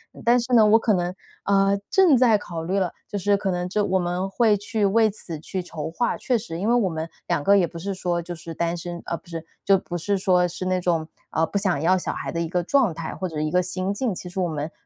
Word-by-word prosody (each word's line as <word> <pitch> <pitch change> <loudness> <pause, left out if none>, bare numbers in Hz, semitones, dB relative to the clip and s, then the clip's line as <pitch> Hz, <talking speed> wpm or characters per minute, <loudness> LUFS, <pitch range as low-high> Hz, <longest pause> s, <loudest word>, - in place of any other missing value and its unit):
嗯， - - -11
但 240 +1 +5
是 245 +1 -5
呢， 225 -3 +7
我 215 +2 +6
可 220 -1 +2
能， 175 -1 0 0.3
啊， 195 0 +3
正 365 -8 +6
在 230 -4 +4
考 165 -4 -6
虑 190 +4 0
了， 185 -3 0 0.2
就 205 - -4
是 200 +1 +2
可 195 -1 -1
能 180 0 -2
就 210 +2 +1
我 190 -1 +1
们 180 +2 -2
会 220 +1 +3
去 210 +1 -1
为 220 +2 +4
此 175 -6 -7
去 185 +4 -4
筹 160 -4 -6
划。 240 +8 0
确 250 -2 +1
实 205 -7 -6
因 205 +4 0
为 - - +4
我 230 -6 +3
们 160 0 -4 0.2
两 - - 0
个 200 +6 +5
也 180 -3 +3
不 170 - -10
是 195 +4 -3
说 175 -2 -1
就 175 +1 -6
是 165 0 -8
单 170 +1 -1
身 175 0 -6
啊， 170 - -2
不 - - -22
是， 165 -1 -6 0.2
就 195 - +5
不 175 -1 -5
是 195 +4 0
说 180 -2 +3
是 175 +2 -6
那 185 0 +1
种， 170 -3 0 0.2
呃， 160 - +2
不 200 - -3
想 190 -7 0
要 185 +4 +4
小 180 - -3
孩 - - -5
的 170 - -3
一 165 - -1
个 180 +2 0
状 245 -1 +2
态， 160 0 -5
或 185 - -3
者 160 -3 -5
一 155 0 0
个 180 - +3
心 185 +2 -2
境。 225 +1 -1
其 180 - -7
实 180 - -5
我 180 - +1
们， 155 -1 -4
185 Hz, 300 characters per minute, -24 LUFS, 170-205 Hz, 0.3 s, 呢